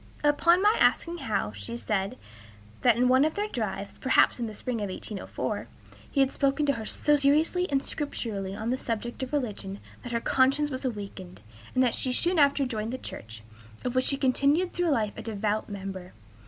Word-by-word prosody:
Upon 335 +5 +4
my 420 +2 +5
asking 340 +1 +2
how, 210 - -1
she 100 +3 -6
said 190 - -2 0.6
that, 240 -2 +4
in 250 +1 +3
one 260 +2 +5
of 310 +1 +1
their 415 +1 -1
drives, 205 - -4
perhaps 260 - +4
in 235 - -1
the 215 - -7
spring 245 +3 -3
of 205 - -2
1804, 195 +2 -4 0.4
he 275 - +2
had 270 0 +2
spoken 275 +1 +1
to 280 - +3
her 225 -4 -5
so 295 0 +2
seriously 310 +6 +2
and 275 -1 0
scripturally 205 -10 -3
on 220 +3 -2
the 260 - -1
subject 235 +2 -4
of 260 - -4
religion 210 -8 -3 0.2
that 245 - -7
her 235 - +1
conscience 275 +5 +2
was 260 0 -4
awakened, 200 -6 -6 0.3
and 255 -2 +3
she 255 - 0
soon 345 +5 +3
after 280 -1 +4
joined 225 -3 -3
the 260 - -3
church, 110 - -8 0.4
of 250 - -1
which 255 0 +2
she 275 - +1
continued 280 +7 +2
through 355 -1 +1
life 220 -8 +1
a - - -5
devout 215 -1 -2
member. 190 -2 -6
250 Hz, 195 wpm, -28 LUFS, 210-285 Hz, 0.6 s, my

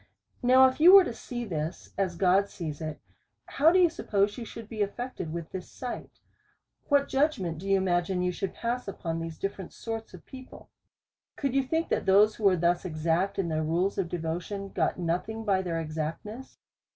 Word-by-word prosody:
Now 255 +1 +7
if 260 - -3
you 350 +4 +8
was 390 -2 +9
to - - -4
see 240 +1 -6
this, 160 -3 -5
as 185 -3 -1
God 195 +2 +3
sees 155 -4 -6
it, 155 -1 -5 0.5
how 310 +4 +4
do 365 - +4
you 360 -2 +6
suppose 205 -10 0
you 240 - -6
should 225 0 -9
be 220 -1 -5
affected 205 -4 -3
with 170 -1 -6
this 185 - -6
sight? 250 -2 -7 0.7
What 285 -1 +4
judgment 235 - 0
do 195 +3 -6
you 195 - +5
imagine 180 0 0
you 180 - +1
should 185 +1 -4
pass 240 0 -3
upon 165 -4 -4
these 165 -1 -6
different 195 -2 -5
sorts 225 -1 -6
of - - -15
people? 260 -1 -12 0.6
Could 275 -3 -2
you 275 - +3
think, 320 +5 -1
that - - -1
those 205 +3 +6
who 215 - -3
were 190 -2 +5
thus 175 +1 +1
exact 170 +3 0
in 195 -3 0
their 155 -1 -1
rules 175 +6 0
of 180 -3 -1
devotion, 175 +4 -4
got - - 0
nothing 180 +6 -2
by 195 -3 +2
their 170 -3 -2
exactness 165 +10 -5
195 Hz, 195 wpm, -28 LUFS, 170-235 Hz, 0.7 s, was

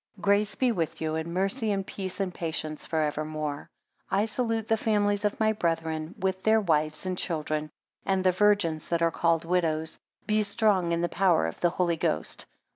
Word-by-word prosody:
23 195 - -16
Grace 200 +1 +2
be 255 -2 +2
with 165 -8 -2
you, 155 -1 -2
and 160 +1 -3
mercy, 195 +5 0
and 195 -1 -1
peace, 190 -1 -5
and 190 -2 -1
patience, 155 -2 -4
for 160 -1 0
evermore. 150 -1 -3 0.4
24 195 - +2
I 210 - +3
salute 225 -1 -1
the 225 - +3
families 205 -2 +1
of 210 0 0
my 220 0 +3
brethren, 165 -4 -2
with 190 0 -1
their 220 +2 +4
wives 155 -4 0
and 185 -1 -1
children; 155 -3 -2 0.3
and 190 -1 +1
the 185 - +5
virgins 185 -5 +2
that 170 -1 +1
are 165 - +3
called 165 -1 +1
widows. 165 -2 0 0.3
Be 215 0 +2
strong 200 -4 +2
in 170 0 +1
the 175 - +1
power 175 - +3
of 80 - -5
the 175 - +3
Holy 170 -1 0
Ghost. - - -1
180 Hz, 200 wpm, -28 LUFS, 160-205 Hz, 0.4 s, the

